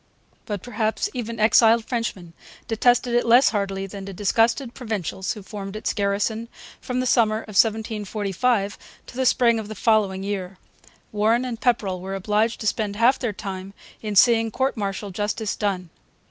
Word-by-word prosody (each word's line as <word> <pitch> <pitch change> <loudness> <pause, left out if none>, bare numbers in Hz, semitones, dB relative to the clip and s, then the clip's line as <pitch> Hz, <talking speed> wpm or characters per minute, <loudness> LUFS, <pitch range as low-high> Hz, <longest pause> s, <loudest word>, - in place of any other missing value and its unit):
But 205 -3 -4
perhaps 240 - -1
even 230 -2 -5
exiled 225 +1 +5
Frenchmen 215 -9 -4 0.3
detested 240 +2 +2
it 240 - +3
less 240 +3 +6
heartily 195 -2 -2
than 195 0 -8
the 195 - -7
disgusted 230 +6 +1
Provincials 205 - -3
who 210 - -10
formed 195 0 -7
its 215 - -2
garrison 205 +3 -1 0.3
from 250 0 -3
the 255 - 0
summer 225 -3 +3
of - - -14
1745 210 0 0 0.3
to - - -13
the 260 0 +1
spring 235 -3 +3
of 215 - -6
the 215 - -7
following 200 -3 +1
year. 195 -2 -4 0.5
Warren 220 +4 +2
and 240 -2 -5
Pepperrell 200 -7 0
were 190 +1 -5
obliged 210 +4 0
to - - -5
spend 205 -1 -1
half 240 +5 +3
their 240 -4 -1
time 195 -1 -7 0.3
in 210 -2 -4
seeing 225 +2 +5
court 260 +5 -1
martial 200 -1 -4
justice 205 +2 -2
done. 185 -5 -2
215 Hz, 165 wpm, -23 LUFS, 200-235 Hz, 0.5 s, less